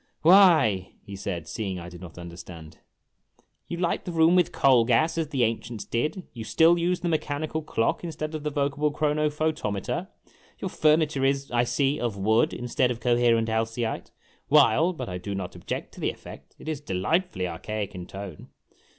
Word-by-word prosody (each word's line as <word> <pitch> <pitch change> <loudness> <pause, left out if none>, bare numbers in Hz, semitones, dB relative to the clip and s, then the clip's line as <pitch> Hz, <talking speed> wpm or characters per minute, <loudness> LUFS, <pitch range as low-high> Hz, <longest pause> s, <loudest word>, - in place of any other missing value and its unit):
"Why," 160 - +5
he 100 - -9
said, 85 -4 -5
seeing 100 -5 -4
I 85 -1 -7
did 90 0 -11
not 90 -3 -11
understand, 85 -2 -10 0.9
"you 170 - -4
light 170 -1 -1
the 180 - -5
room 165 +1 +4
with 180 - +3
coal 130 -4 +4
gas, 155 +8 +2
as 165 -2 -1
the 135 -4 0
ancients 115 -1 -2
did. 150 +10 -2
You 115 - -6
still 165 +9 +4
use 175 +1 0
the 175 - -1
mechani 155 -2 -1
cal 160 - -2
clock 115 -4 -1
instead 155 -2 -4
of 155 - -4
the 150 - -2
vocable 145 +1 0
chronophotometer; 150 -7 -1 0.5
your - - -4
furniture 155 -3 +2
is, 135 0 0
I 120 0 +2
see, 140 +3 +1
of 115 -4 -2
wood 110 +4 +2
instead 125 +1 0
of 120 -2 -3
coherent 120 -1 +3
alcyite, 115 +1 -2 0.4
while 150 +3 +5
but 170 - -6
I 90 -1 -5
clo 100 +2 -5
not 95 -2 -5
object - - -5
to - - -12
the - - 0
effect - - -11
it - - -13
is 155 -2 -3
delightfully 95 - -1
archaic 100 +4 -4
in 90 -1 -7
tone 95 -5 -9
125 Hz, 180 wpm, -26 LUFS, 100-155 Hz, 0.9 s, Why